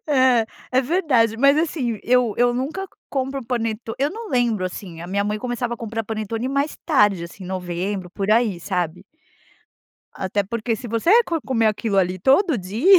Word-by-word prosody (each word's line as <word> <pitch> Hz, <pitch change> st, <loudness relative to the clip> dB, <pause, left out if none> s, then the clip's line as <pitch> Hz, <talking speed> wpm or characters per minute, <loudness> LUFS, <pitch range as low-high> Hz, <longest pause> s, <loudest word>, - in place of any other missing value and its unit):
É, 260 Hz, -5 st, +4 dB, 0.3 s
é 255 Hz, -, +5 dB
verdade. 260 Hz, -, +2 dB
Mas 275 Hz, +4 st, +5 dB
assim, 285 Hz, -8 st, -1 dB
eu 245 Hz, -2 st, +3 dB
eu 245 Hz, 0 st, +3 dB
nunca 290 Hz, +10 st, -3 dB, 0.2 s
compro 270 Hz, 0 st, -2 dB
o -, -, -10 dB
paneto 225 Hz, -2 st, -2 dB
eu 280 Hz, +3 st, +1 dB
não 450 Hz, +3 st, -7 dB
lembro 235 Hz, -7 st, +1 dB
assim. 180 Hz, -2 st, -6 dB
A 170 Hz, -, -6 dB
minha 200 Hz, +2 st, 0 dB
mãe 210 Hz, +1 st, -1 dB
começava 245 Hz, 0 st, -2 dB
a -, -, -11 dB
comprar 225 Hz, 0 st, -4 dB
panetone 220 Hz, +3 st, -3 dB
mais 280 Hz, +2 st, -1 dB
tarde, 210 Hz, -, +3 dB
assim, 175 Hz, +3 st, -10 dB
novembro, 185 Hz, +1 st, -3 dB
por 195 Hz, +2 st, -2 dB
aí 220 Hz, -4 st, +3 dB
sabe. 180 Hz, -1 st, -2 dB, 1.1 s
Até 195 Hz, +2 st, -1 dB
porque 230 Hz, +2 st, -2 dB
se 240 Hz, -, -8 dB
você 335 Hz, -, +4 dB
co 335 Hz, -4 st, -2 dB
comer 235 Hz, -5 st, +1 dB
aquilo 215 Hz, -1 st, 0 dB
ali 185 Hz, 0 st, +1 dB
todo 275 Hz, -, +4 dB
dia. 230 Hz, -, +5 dB
230 Hz, 180 wpm, -22 LUFS, 200-265 Hz, 1.1 s, é